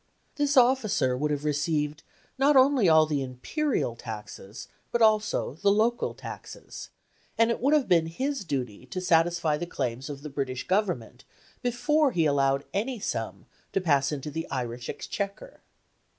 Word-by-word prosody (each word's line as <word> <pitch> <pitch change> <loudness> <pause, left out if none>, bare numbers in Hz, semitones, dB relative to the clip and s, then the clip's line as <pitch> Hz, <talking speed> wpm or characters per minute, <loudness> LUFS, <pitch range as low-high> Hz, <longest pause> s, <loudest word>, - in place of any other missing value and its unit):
This 290 -1 +1
officer 240 - +3
would 150 +4 -1
have 145 0 -2
received 150 0 -1 0.4
not 280 +2 +4
only 260 -7 +5
all 160 -1 +6
the 150 -2 -1
imperial 130 - -2
taxes, 105 -1 -8 0.2
but 235 - +1
also 215 - +2
the 200 +7 +1
local 225 +4 +1
taxes; - - -9 0.5
and 230 +1 +4
it - - -2
would 280 +4 +4
have 290 -4 +2
been 165 -2 +3
his 265 - -3
duty 130 - -4
to 155 - -4
satisfy 170 -3 +2
the 175 - -4
claims 125 -3 -3
of 140 -1 -7
the 150 - -6
British 135 -2 -3
Government 175 - -1 0.4
before 275 +4 +2
he 165 -2 +2
allowed 140 -1 +2
any 230 +5 -2
sum 115 - -4 0.3
to - - +2
pass 145 -6 +2
into 150 0 -4
the 160 +2 -5
Irish 120 -2 -4
Exchequer. 200 - -5
160 Hz, 155 wpm, -27 LUFS, 135-230 Hz, 0.5 s, all